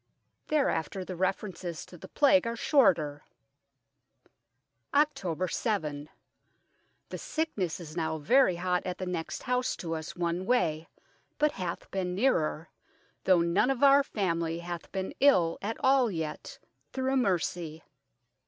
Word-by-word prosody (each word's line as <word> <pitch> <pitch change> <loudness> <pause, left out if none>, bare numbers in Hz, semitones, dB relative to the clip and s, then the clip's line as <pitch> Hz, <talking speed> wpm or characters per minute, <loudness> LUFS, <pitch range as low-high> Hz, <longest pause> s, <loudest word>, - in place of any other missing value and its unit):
Thereafter 195 - 0
the 185 - -6
references 185 -2 -3
to - - -14
the 170 - -11
Plague 285 -3 +4
are 230 - -2
shorter 175 - +2 0.8
" 120 -1 -42
October 185 - +1
7. 155 - -2 1.0
The - - -5
sicknes 210 - -2
is 160 -2 -9
now 160 -2 -1
very 225 - +4
hot 180 +1 0
at 180 -1 -4
the 185 - -4
next 175 -3 -4
house 250 0 0
to 165 -2 -5
us 160 -1 -5
one 175 +1 -2
way, 165 -10 +1 0.5
but 300 0 +3
hath 180 -6 -5
beene 180 -2 -2
neerer, 165 - +1 0.6
though 185 -3 +5
none 170 +8 +2
of 270 0 0
our 280 0 +7
family 170 -9 -1
hath 170 0 -7
been 190 -1 -3
ill 180 -13 +4
at 220 +3 -3
all 260 -2 +4
yet, 160 -5 -5 0.3
through 265 0 0
mercy. 175 -7 -1
180 Hz, 135 wpm, -29 LUFS, 165-240 Hz, 1.0 s, our